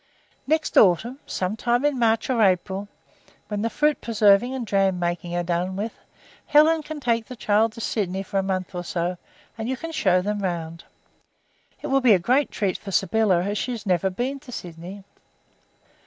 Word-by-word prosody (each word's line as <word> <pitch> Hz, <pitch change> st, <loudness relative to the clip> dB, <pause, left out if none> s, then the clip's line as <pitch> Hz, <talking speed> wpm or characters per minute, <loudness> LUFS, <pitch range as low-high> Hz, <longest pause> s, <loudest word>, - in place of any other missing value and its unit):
Next 315 Hz, +2 st, +3 dB
autumn, 225 Hz, -, +3 dB
some 185 Hz, +3 st, -2 dB
time 240 Hz, +4 st, 0 dB
in 290 Hz, -3 st, +1 dB
March 225 Hz, -1 st, +2 dB
or 235 Hz, -3 st, +1 dB
April, 190 Hz, 0 st, +1 dB, 0.6 s
when 205 Hz, -1 st, -2 dB
the 230 Hz, -, 0 dB
fruit 300 Hz, +4 st, +1 dB
preserving 215 Hz, +1 st, +3 dB
and 245 Hz, -4 st, -4 dB
jam 195 Hz, -2 st, +2 dB
making 175 Hz, 0 st, -3 dB
are 175 Hz, -, 0 dB
done 175 Hz, +2 st, -1 dB
with, 210 Hz, +4 st, -3 dB, 0.5 s
Helen 310 Hz, +2 st, +5 dB
can 310 Hz, 0 st, -7 dB
take 230 Hz, -4 st, 0 dB
the 255 Hz, -, -8 dB
child 215 Hz, 0 st, +2 dB
to 230 Hz, -, -9 dB
Sydney 195 Hz, -4 st, -2 dB
for 195 Hz, 0 st, -2 dB
a -, -, +2 dB
month 190 Hz, -1 st, -3 dB
or 175 Hz, -1 st, -4 dB
so, 175 Hz, 0 st, -3 dB, 0.4 s
and 220 Hz, +2 st, -3 dB
you 260 Hz, -, -2 dB
can 330 Hz, +4 st, -6 dB
show 185 Hz, -, +2 dB
them 210 Hz, +1 st, -2 dB
round. 170 Hz, -3 st, -4 dB, 1.0 s
It -, -, -4 dB
will 270 Hz, 0 st, +3 dB
be 245 Hz, -4 st, +6 dB
a -, -, +4 dB
great 255 Hz, +11 st, +1 dB
treat 195 Hz, -3 st, -2 dB
for 205 Hz, -, -9 dB
Sybylla 195 Hz, -2 st, +2 dB
as 200 Hz, +1 st, -2 dB
she 250 Hz, -, -2 dB
has 230 Hz, -2 st, -7 dB
never 185 Hz, -1 st, +1 dB
been 250 Hz, +9 st, -3 dB
in 260 Hz, -, -11 dB
Sydney." 180 Hz, 0 st, -8 dB
205 Hz, 190 wpm, -24 LUFS, 185-245 Hz, 1.0 s, be